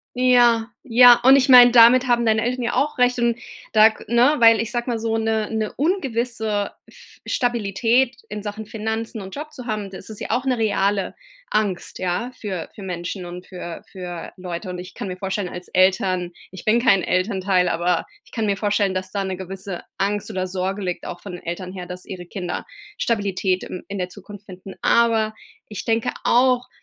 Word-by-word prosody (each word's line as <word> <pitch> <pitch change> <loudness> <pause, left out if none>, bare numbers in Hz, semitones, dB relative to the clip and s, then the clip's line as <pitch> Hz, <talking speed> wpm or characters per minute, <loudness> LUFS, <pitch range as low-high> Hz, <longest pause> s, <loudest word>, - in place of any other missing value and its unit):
Ja, 240 -2 +4
ja. 245 -1 +7
Und 265 +2 +8
ich 275 0 +2
meine, 245 -2 +9
damit 245 +2 +7
haben 240 -1 +2
deine 220 -1 +3
Eltern 250 +1 -2
ja 235 - -1
auch 290 -1 0
recht. 250 0 +3
Und 235 -1 +1 0.3
da 215 0 +7
g 220 - -11
ne, 245 +5 +5
weil 230 -1 +7
ich 230 - -3
sage 240 0 -2
mal 235 - -1
so 225 0 -1
'ne 220 -1 0
'ne 220 -1 -2
ungewisse 235 - -1 0.2
F - - -16
Stabilität 235 +1 +1
in 210 0 -6
Sachen 210 +1 -6
Finanzen 220 0 -4
und 190 0 -9
Job 300 +1 -7
zu 250 - -9
haben, 215 -4 -3
das 190 +2 -9
ist 215 - -8
ja - - -4
auch 250 - 0
'ne 255 -2 0
reale 200 -3 0 0.4
Angst, 200 -4 -1
ja, 185 +7 -2
für 190 -6 -5
für 205 - -10
Menschen 180 0 -5
und 175 +1 -9
für 175 -2 -8
für 180 -3 -7
Leute. 180 +1 -6
Und 180 0 -5
ich 180 - -10
kann 200 - -6
mir 180 - -5
vorstellen, 190 0 -3
als 180 0 -8
Eltern 185 -1 +2 0.2
ich 185 - -11
bin 220 +2 +4
kein 200 -6 +4
Elternteil, 185 -1 +1
aber 175 +1 0 0.2
ich - - -22
kann 225 - -2
mir 200 -2 0
vorstellen, 205 -2 +1
dass 185 0 -4
da 200 -1 -2
'ne 190 -1 -4
gewisse 190 0 -6 0.2
Angst 205 +2 -1
oder 185 -3 -2
Sorge 190 +2 -3
liegt, 180 -2 -4
auch 175 - -7
von 200 - -8
den 175 - -8
Eltern 180 +2 -5
her, 180 -2 -7
dass 180 0 -8
ihre 180 -2 -8
Kinder 180 -1 -5 0.3
Stabilität 195 -4 0
im 185 - -7
in 200 - -5
der 180 -1 -3
Zukunft 205 +1 -12
finden. 190 0 -11
Aber 225 -2 +3 0.3
ich 210 - -7
denke 225 0 +1
auch 250 0 +3
210 Hz, 200 wpm, -22 LUFS, 185-235 Hz, 0.4 s, meine